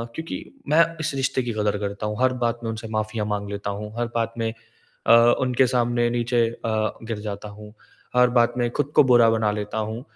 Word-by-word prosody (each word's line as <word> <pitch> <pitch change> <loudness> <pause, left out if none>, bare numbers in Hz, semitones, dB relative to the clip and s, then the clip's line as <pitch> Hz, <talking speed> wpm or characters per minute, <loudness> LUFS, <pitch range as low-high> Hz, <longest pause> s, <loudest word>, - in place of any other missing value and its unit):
क्योंकि 160 0 -5 0.3
मैं 165 +3 +6 0.2
इस 155 -1 -2
रिश्ते 135 -1 0
की 120 -2 -3
कदर 105 -1 0
करता 100 0 -4
हूँ। 105 0 -4
हर 130 0 +3
बात 115 0 -1
में 115 - -2
उनसे 110 0 -6
माफ़ियाँ 110 0 -2
माँग 100 -1 -3
लेता 100 0 -4
हूँ, 105 +1 -6
हर 120 - 0
बात 115 -1 -1
में, 115 -1 -1 0.6
अ, - - +7 0.3
उनके 130 0 +3
सामने 120 -1 +1
नीचे 120 0 +1
अ, 110 -2 -2
गिर 115 -1 -4
जाता 105 0 -6
हूँ, 105 +1 -12 0.4
हर 125 0 +5
बात 120 0 +4
में 120 -1 +1
ख़ुद 145 - -1
को - - +8
बुरा 120 -3 +5
बना 110 -1 +1
लेता 105 +1 -4
हूँ। 110 +2 -3
115 Hz, 215 wpm, -23 LUFS, 105-120 Hz, 0.6 s, को